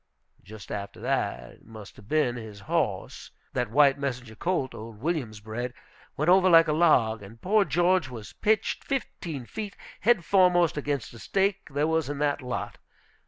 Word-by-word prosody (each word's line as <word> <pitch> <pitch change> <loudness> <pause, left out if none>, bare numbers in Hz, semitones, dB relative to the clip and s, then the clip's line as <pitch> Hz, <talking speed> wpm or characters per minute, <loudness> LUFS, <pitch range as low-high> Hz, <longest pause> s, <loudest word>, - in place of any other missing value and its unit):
Just 105 +2 -11
after 100 -1 -5
that, - - -2
it - - -20
must 110 -3 -12
have 100 - -15
been, 150 -4 +1
his 110 -4 -9
horse - - -2 0.2
that 125 -3 -1
white 140 +3 +4
Messenger 125 -4 -4
colt 155 -1 -1
old 110 -1 -9
Williams 130 -8 -2
bred 120 +3 -5 0.4
went 150 - 0
over 185 +1 +6
like 165 -1 +7
a 155 - +1
log, 125 -10 +3
and 105 +3 -12
poor 210 - +3
George 175 -4 +2
was 115 -4 -9
pitched 215 0 0
fifteen 170 - -4
feet 210 - -6 0.2
head 215 -5 +3
foremost 180 -3 +4
against 145 -4 -3
a 115 - -11
stake 195 - 0
there 145 +2 0
was 160 -3 0
in 145 - -3
that 145 0 0
lot. 125 -1 -5
140 Hz, 170 wpm, -27 LUFS, 115-175 Hz, 0.4 s, like